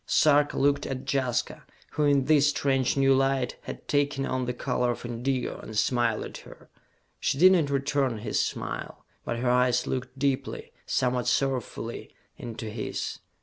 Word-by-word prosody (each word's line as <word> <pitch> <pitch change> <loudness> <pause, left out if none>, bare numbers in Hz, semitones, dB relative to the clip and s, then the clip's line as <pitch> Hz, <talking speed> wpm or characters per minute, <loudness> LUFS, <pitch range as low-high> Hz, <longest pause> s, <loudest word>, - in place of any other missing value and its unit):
Sarka 145 -1 +4
looked 140 +1 +2
at 135 0 -5
Jaska 130 -3 -1 0.3
who, 150 0 0
in 140 -2 +3
this 145 0 +5
strange 135 -3 +1
new 135 0 +5
light, 135 -1 +1
had - - -8
taken 145 -1 +1
on 130 -1 -1
the 125 - -1
color 125 -1 -1
of 120 - -10
indigo, 120 +2 -2
and 110 - -7
smiled 120 -1 +1
at - - -8
her. - - -15 0.5
She - - 0
did 185 +5 +7
not 165 -6 +3
return 140 -3 0
his 105 0 0
smile, - - -5 0.2
but 120 - -2
her 125 +1 0
eyes 125 0 +3
looked 130 +1 -4
deeply, 135 0 -2 0.2
somewhat 125 -1 0
sorrowfully, 125 -3 -2 0.2
into 115 -2 -7
his. 110 0 -4
130 Hz, 160 wpm, -27 LUFS, 125-140 Hz, 0.5 s, did